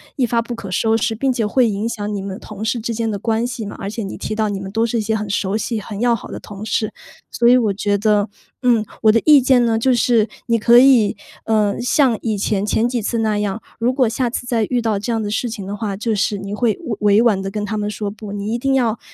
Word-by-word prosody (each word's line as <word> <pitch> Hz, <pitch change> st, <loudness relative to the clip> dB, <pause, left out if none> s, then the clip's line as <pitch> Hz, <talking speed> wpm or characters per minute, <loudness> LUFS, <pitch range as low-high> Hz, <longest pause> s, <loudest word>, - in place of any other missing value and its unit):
一 265 Hz, -, +1 dB
发 235 Hz, 0 st, +1 dB
不 240 Hz, +1 st, -6 dB
可 200 Hz, -4 st, -8 dB
收 220 Hz, +4 st, +2 dB
拾， 225 Hz, 0 st, 0 dB
并 265 Hz, +4 st, 0 dB
且 235 Hz, -3 st, -1 dB
会 240 Hz, +3 st, +3 dB
影 205 Hz, +2 st, -2 dB
响 210 Hz, -2 st, -4 dB
你 200 Hz, -, -3 dB
们 195 Hz, 0 st, -6 dB
同 210 Hz, 0 st, -8 dB
事 230 Hz, +2 st, -1 dB
之 230 Hz, +1 st, -3 dB
间 225 Hz, 0 st, -1 dB
的 205 Hz, -, -2 dB
关 225 Hz, +2 st, 0 dB
系 235 Hz, -3 st, -5 dB
嘛， 205 Hz, -, -7 dB
而 195 Hz, -, -4 dB
且 220 Hz, +2 st, -5 dB
你 195 Hz, -, -6 dB
提 215 Hz, -, -4 dB
到 215 Hz, -1 st, 0 dB
你 200 Hz, -, -3 dB
们 190 Hz, 0 st, -7 dB
都 225 Hz, +2 st, +1 dB
是 235 Hz, +1 st, -1 dB
一 -, -, 0 dB
些 220 Hz, +1 st, -1 dB
很 210 Hz, -1 st, -3 dB
熟 195 Hz, +1 st, 0 dB
悉 225 Hz, 0 st, -2 dB
很 205 Hz, 0 st, -7 dB
要 240 Hz, 0 st, +3 dB
好 225 Hz, -, -9 dB
的 -, -, -6 dB
同 205 Hz, +1 st, -9 dB
事。 215 Hz, 0 st, -1 dB, 0.4 s
所 235 Hz, -, +2 dB
以 245 Hz, -, +7 dB
我 225 Hz, -5 st, +1 dB
觉 205 Hz, +1 st, 0 dB
得 210 Hz, 0 st, +2 dB, 0.4 s
嗯， 235 Hz, -3 st, +3 dB, 0.2 s
我 215 Hz, -, +7 dB
的 230 Hz, -, +3 dB
意 300 Hz, -2 st, +8 dB
见 255 Hz, -1 st, +4 dB
呢 225 Hz, -1 st, +2 dB
就 255 Hz, +3 st, +2 dB
是， 235 Hz, -2 st, +3 dB, 0.2 s
你 230 Hz, -1 st, +3 dB
可 235 Hz, +2 st, +6 dB
以， 250 Hz, -5 st, +5 dB, 0.3 s
呃， 215 Hz, -2 st, +1 dB
像 250 Hz, -1 st, +2 dB
以 220 Hz, -2 st, 0 dB
前， 200 Hz, 0 st, 0 dB
前 220 Hz, +2 st, +1 dB
几 240 Hz, -2 st, -1 dB
次 230 Hz, +2 st, -1 dB
那 215 Hz, -2 st, +1 dB
样， 205 Hz, +1 st, -2 dB, 0.2 s
如 240 Hz, +3 st, +1 dB
果 255 Hz, -2 st, +2 dB
下 240 Hz, +2 st, -1 dB
次 245 Hz, -, -4 dB
再 235 Hz, -3 st, +1 dB
遇 245 Hz, -1 st, +1 dB
到 220 Hz, -3 st, 0 dB
这 210 Hz, +4 st, -3 dB
样 225 Hz, -, 0 dB
的 210 Hz, -, -3 dB
事 220 Hz, +4 st, -1 dB
情 205 Hz, -4 st, -6 dB
的 200 Hz, -, -4 dB
话， 205 Hz, -2 st, -3 dB
就 220 Hz, +1 st, -1 dB
是 205 Hz, 0 st, 0 dB
你 200 Hz, +1 st, -7 dB
会 220 Hz, 0 st, +1 dB
委 220 Hz, -4 st, -4 dB, 0.2 s
委 -, -, +6 dB
婉 225 Hz, -5 st, +3 dB
地 195 Hz, 0 st, -4 dB
跟 210 Hz, +1 st, -3 dB
他 215 Hz, +1 st, -3 dB
们 210 Hz, 0 st, -2 dB
说 210 Hz, 0 st, -4 dB
不， 210 Hz, 0 st, -9 dB
你 205 Hz, +1 st, -4 dB
一 -, -, 0 dB
定 270 Hz, +2 st, 0 dB
要 235 Hz, -4 st, +1 dB
220 Hz, 305 characters per minute, -19 LUFS, 205-235 Hz, 0.4 s, 意